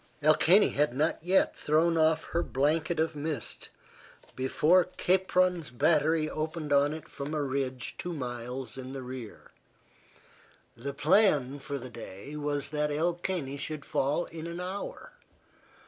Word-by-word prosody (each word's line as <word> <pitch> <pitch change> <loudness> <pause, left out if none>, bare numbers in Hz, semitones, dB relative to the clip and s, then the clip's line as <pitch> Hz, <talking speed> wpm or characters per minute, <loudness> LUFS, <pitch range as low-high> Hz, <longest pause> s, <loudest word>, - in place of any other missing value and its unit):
El 155 +1 +7
Caney 190 +7 +5
had 145 -3 +1
not 155 +4 +1
yet 185 +3 +2
thrown 160 +3 +2
off 160 0 +3
her 170 - +2
blanket 155 +4 0
of 160 0 0
mist 145 -4 -5 0.7
before 155 +7 +3
Capron's 180 -3 +1
battery 155 +4 +2
opened 155 -1 -3
on 140 +1 +4
it 155 0 -7
from 145 +2 -5
a 150 - 0
ridge 130 -2 -3
two 175 - -4
miles 125 -3 -5
in 130 0 -7
the 135 -1 -6
rear. 125 -3 -9 1.2
The 140 +4 -5
plan 150 -5 +3
for 140 +1 -5
the 130 -1 -8
day 115 +4 -8
was 145 -1 -2
that 150 0 0
El 165 +4 +1
Caney 170 -6 -3
should 150 0 -5
fall 145 +6 0
in 165 0 -7
an 170 +1 -5
hour. 190 - -6
150 Hz, 145 wpm, -29 LUFS, 135-165 Hz, 1.2 s, El